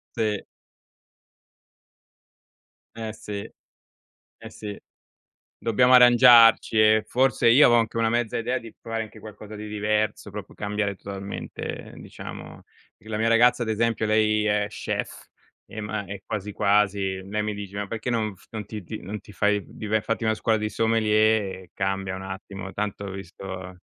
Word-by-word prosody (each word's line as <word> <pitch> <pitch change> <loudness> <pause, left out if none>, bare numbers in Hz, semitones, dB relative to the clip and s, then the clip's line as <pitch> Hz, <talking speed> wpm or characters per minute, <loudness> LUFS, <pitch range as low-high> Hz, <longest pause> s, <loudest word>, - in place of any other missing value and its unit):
Sì. 105 -3 0 2.6
Eh 110 -1 -5
sì. 105 -2 -7 0.9
Eh - - -10
sì. 105 -2 -7 0.8
Dobbiamo 125 +3 +3
arrangiarci 120 -3 +7
e 110 0 +5
forse 125 -1 +2
io 135 +6 +7
avò 120 -1 +5
anche 115 0 -1
una 115 -1 +2
mezza 120 -1 0
idea 120 +3 -1
di 115 -2 -12
provare 115 -1 -4
anche 110 - -14
qualcosa 110 0 -10
di 105 0 -7
diverso, 105 0 -1
proprio 100 -2 -8
cambiare 105 -1 -2
totalmente, 100 0 -7
diciamo. - - -10 0.3
Perchè 110 - -17
la 105 - -1
mia 115 - +2
ragazza 120 +2 +4
ad 110 - -3
esempio 110 0 0
lei 110 0 +2
è 105 -1 +1
chef, - - -4 0.4
ehm, 110 -1 -7
ma 105 -1 -3
e 100 +1 -8
quasi 105 -1 -4
quasi. 100 -2 +1
Lei 105 +3 -3
mi 105 -1 -2
dice: 100 -1 -7
"Ma 100 0 -3
perché 115 +4 -4
non 110 -4 -1
f - - -22
non 110 -3 -6
ti 105 -1 -7
ti 110 +5 -7
non 105 +3 -6
ti - - -16
fai 105 +2 +1
di 110 - -9
vai 110 +1 +2
a - - -5
fatti 115 0 -2
una 110 0 +2
scuola 110 0 +1
di 105 0 -2
sommelier 110 -1 +3 0.2
e 90 - -18
cambia 95 0 -2
un 95 - -7
attimo, 95 +1 -7
tanto 105 0 -3
ho 100 - -5
visto" 95 -1 -8
105 Hz, 170 wpm, -25 LUFS, 100-115 Hz, 2.6 s, arrangiarci